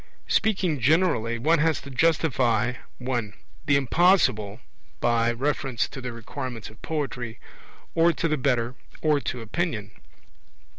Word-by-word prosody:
Speaking 185 -8 +1
generally, 125 -5 +2
one 155 +7 +3
has 160 -1 +2
to 140 - -10
justify 130 -6 +2 0.2
(1) 120 -5 -3 0.3
the 145 - +4
Impossible 135 - +3 0.4
by 120 -1 +2
reference 135 -1 -1
to 135 - -8
the 125 -1 -4
requirements 115 0 -6
of 110 - -19
poetry, 125 -7 -4 0.5
or 165 +1 +4
to 165 - -1
the 155 - +1
better, 125 -3 0 0.3
or 150 -2 +3
to 125 -3 -4
opinion. 110 - -2
130 Hz, 130 wpm, -25 LUFS, 115-155 Hz, 0.5 s, the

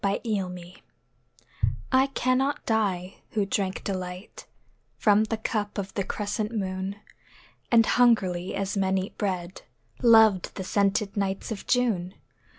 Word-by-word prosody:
The 200 0 +1
Wine 180 -5 -3 1.2
I 260 +1 +4
cannot 270 +1 0
die, 195 -5 0 0.2
who 210 -2 +1
drank 195 -1 -2
delight 185 0 -6 0.5
From 210 0 +4
the 225 +1 -2
cup 215 -2 -3
of 195 -1 -4
the 195 - -1
crescent 210 +2 -3
moon, 190 -2 -3 0.8
And 230 -1 +6
hungrily 195 -8 +2
as 195 +1 -2
men 190 -1 +1
eat 190 +1 -4
bread, 185 -3 -3 0.4
Loved 220 -5 +5
the 190 - -4
scented 200 +1 0
nights 195 +1 -2
of 210 - -6
June. 210 -8 +1
200 Hz, 130 wpm, -26 LUFS, 190-220 Hz, 1.2 s, And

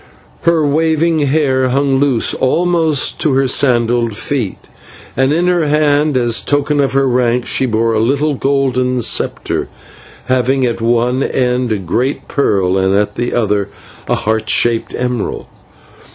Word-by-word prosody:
Her 165 -2 +2
waving 160 +2 +1
hair 135 -3 +1
hung 135 +1 +1
loose 135 -5 +1
almost 160 0 0
to 150 - +1
her 135 0 +2
sandalled 120 -4 +1
feet, 130 - -3 0.6
and 135 +1 +1
in 170 +3 +1
her 175 -3 +1
hand, 150 -1 +2
as 120 -2 +1
a - - -16
token 145 +1 0
of 135 -1 +1
her 135 0 +2
rank, 125 -1 +1
she 130 - -1
bore 115 0 0
a 110 - +1
little 140 +6 +1
golden 130 -2 0
sceptre, - - -1 0.6
having 130 +1 +1
at 120 -1 -2
one 120 +3 +1
end 125 -2 0
a 110 - +1
great 115 - -2
pearl, 95 -8 0
and 95 +1 +1
at 105 +1 0
the 120 +1 -3
other 105 -4 0 0.4
a - - +1
heart 110 -1 -2
shaped 115 +3 +1
emerald. 125 -3 -3
130 Hz, 150 wpm, -14 LUFS, 115-145 Hz, 0.6 s, Her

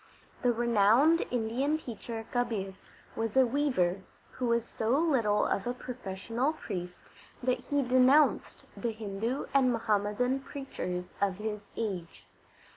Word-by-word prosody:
The 245 - +3
renowned 235 +7 +4
Indian 250 +6 0
teacher 230 -4 -7
Kabir 225 -6 -1 0.4
was 225 +1 -2
a 260 - +7
weaver, 240 -9 +1 0.3
who 250 - -3
was 235 -1 +2
so 230 +4 0
little 250 -10 +2
of 195 - -1
a 245 - -1
professional 240 +3 -3
priest 180 - -7 0.3
that 255 0 +1
he 285 -1 0
denounced 255 +4 +3
the 235 -2 -2
Hindu 220 +4 -3
and 265 -2 +4
Muhammadan 225 +3 +1
preachers 265 -10 -5 0.2
of 195 -2 +2
his 210 0 -5
age. 190 -7 -4
235 Hz, 125 wpm, -30 LUFS, 205-255 Hz, 0.4 s, a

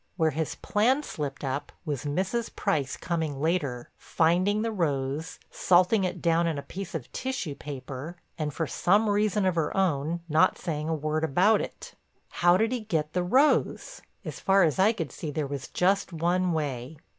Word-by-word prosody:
Where 160 -3 +2
his 160 +1 -3
plan 250 +8 +1
slipped 145 - -5
up 135 +1 -3
was 145 -3 -3
Mrs. 190 +10 -2
Price 145 -9 -1
coming 160 -5 -2
later, 145 -6 -1
finding 185 +6 +2
the 230 - -1
rose, 145 -5 -2
salting 185 +3 +3
it 180 - -4
down 170 0 +3
in 160 -3 -1
a 140 - -5
piece 185 +4 -7
of 145 -7 -6
tissue 260 - -3
paper, 140 +3 -7 0.2
and, 155 -3 -2
for 160 +3 -2
some 205 +8 +2
reason 205 -1 +1
of 185 - +2
her 165 +1 -1
own, 170 -2 0
not 155 0 +3
saying 155 -3 -3
a 165 - +1
word 155 +1 -2
about 185 +9 +3
it. - - -8 0.4
How 175 +1 +4
did 225 +3 +1
he 250 - -1
get 160 -8 -2
the 180 - +1
rose? 275 - +2 0.2
As - - -6
far 195 0 +4
as 160 +2 +1
I 200 +4 +5
could 165 - -4
see 155 - -6
there 150 0 -2
was 140 0 -5
just 195 +2 +1
one 175 +2 +1
way. 145 -2 -3
165 Hz, 180 wpm, -27 LUFS, 150-195 Hz, 0.4 s, I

